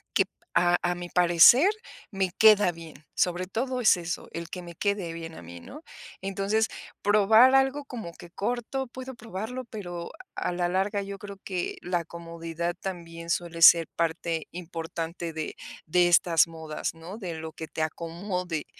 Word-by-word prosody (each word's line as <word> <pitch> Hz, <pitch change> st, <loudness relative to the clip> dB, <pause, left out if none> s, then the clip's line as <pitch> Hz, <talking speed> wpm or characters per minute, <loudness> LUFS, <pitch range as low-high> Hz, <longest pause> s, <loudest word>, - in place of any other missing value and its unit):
que, -, -, +5 dB, 0.3 s
a 175 Hz, 0 st, +4 dB
a 175 Hz, 0 st, +1 dB
mi 175 Hz, 0 st, -7 dB
parecer, 180 Hz, -, +7 dB, 0.4 s
me 195 Hz, -3 st, -1 dB
queda 210 Hz, -4 st, +6 dB
bien. 165 Hz, -2 st, -12 dB
Sobre 180 Hz, 0 st, 0 dB
todo 250 Hz, +6 st, -2 dB
es 220 Hz, -, +6 dB
eso, 175 Hz, -1 st, -5 dB
el 170 Hz, 0 st, -5 dB
que 180 Hz, -, -6 dB
me 170 Hz, -1 st, -10 dB
quede 200 Hz, -3 st, -1 dB
bien 165 Hz, -1 st, -7 dB
a -, -, -10 dB
mí, 85 Hz, +1 st, -10 dB
¿no? 295 Hz, -, -11 dB, 0.4 s
Entonces, 195 Hz, +3 st, 0 dB, 0.4 s
probar 215 Hz, +5 st, +6 dB
algo 270 Hz, +2 st, +3 dB
como 225 Hz, -11 st, -7 dB
que 175 Hz, -1 st, -13 dB
corto, 245 Hz, +6 st, -3 dB
puedo 260 Hz, +2 st, -8 dB
probarlo, 230 Hz, +3 st, -6 dB
pero 175 Hz, -7 st, -7 dB, 0.2 s
a -, -, -2 dB
la 175 Hz, 0 st, 0 dB
larga 195 Hz, +3 st, 0 dB
yo 200 Hz, 0 st, -7 dB
creo 200 Hz, 0 st, -9 dB
que 180 Hz, -3 st, -3 dB
la 175 Hz, -1 st, -1 dB
comodidad 170 Hz, 0 st, -5 dB
también 170 Hz, -3 st, -6 dB
suele 170 Hz, -1 st, -2 dB
ser 165 Hz, 0 st, +9 dB
parte 165 Hz, -1 st, -1 dB
importante 165 Hz, -1 st, -5 dB
de 155 Hz, -1 st, -4 dB, 0.3 s
de 175 Hz, +2 st, +4 dB
estas 170 Hz, -1 st, +4 dB
modas, 160 Hz, -1 st, -5 dB
¿no? 165 Hz, +5 st, -9 dB
De 180 Hz, -6 st, -5 dB
lo 160 Hz, 0 st, -7 dB
que 160 Hz, 0 st, -8 dB
te 160 Hz, -, -3 dB
acomode, 170 Hz, +1 st, -3 dB
175 Hz, 165 wpm, -27 LUFS, 165-205 Hz, 0.4 s, ser